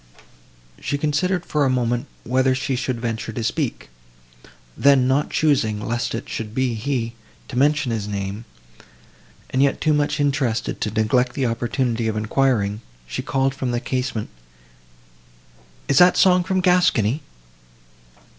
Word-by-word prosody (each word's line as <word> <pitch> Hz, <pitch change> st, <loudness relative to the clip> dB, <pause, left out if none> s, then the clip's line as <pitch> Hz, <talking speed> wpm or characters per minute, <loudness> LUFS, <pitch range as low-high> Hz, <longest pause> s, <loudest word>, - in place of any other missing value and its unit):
She 145 Hz, -, -2 dB
considered 170 Hz, +5 st, 0 dB
for 150 Hz, -1 st, 0 dB
a 135 Hz, -, +3 dB
moment 120 Hz, +1 st, 0 dB, 0.2 s
whether 130 Hz, +2 st, +2 dB
she 130 Hz, 0 st, -1 dB
should 125 Hz, -1 st, -2 dB
venture 115 Hz, -1 st, -3 dB
to 115 Hz, +1 st, -4 dB
speak: 125 Hz, +3 st, -2 dB, 0.9 s
then, 135 Hz, -2 st, +4 dB
not 135 Hz, +3 st, +1 dB
choosing, 125 Hz, -9 st, +1 dB
lest 120 Hz, +2 st, -2 dB
it 115 Hz, -, -5 dB
should 110 Hz, -1 st, -5 dB
be 130 Hz, -2 st, +1 dB
he, 115 Hz, 0 st, -2 dB, 0.4 s
to 130 Hz, -, -7 dB
mention 145 Hz, 0 st, +2 dB
his 110 Hz, -3 st, -2 dB
name, 100 Hz, +2 st, -4 dB, 1.1 s
and 130 Hz, -, +1 dB
yet 140 Hz, 0 st, +2 dB
too 155 Hz, 0 st, +2 dB
much 145 Hz, 0 st, 0 dB
interested 135 Hz, -5 st, 0 dB
to 105 Hz, -, 0 dB
neglect 110 Hz, +4 st, +1 dB
the 135 Hz, -, -1 dB
opportunity 120 Hz, 0 st, -1 dB
of 110 Hz, -1 st, -1 dB
enquiring, 110 Hz, -2 st, +1 dB, 0.2 s
she -, -, -4 dB
called 135 Hz, 0 st, 0 dB
from 130 Hz, -1 st, -3 dB
the 120 Hz, 0 st, 0 dB
casement, 125 Hz, -4 st, -3 dB, 1.6 s
"Is 140 Hz, -, +4 dB
that 180 Hz, 0 st, +6 dB
song 180 Hz, -1 st, +5 dB
from 190 Hz, +1 st, 0 dB
Gascony?" 160 Hz, -, +3 dB
130 Hz, 145 wpm, -22 LUFS, 115-145 Hz, 1.6 s, that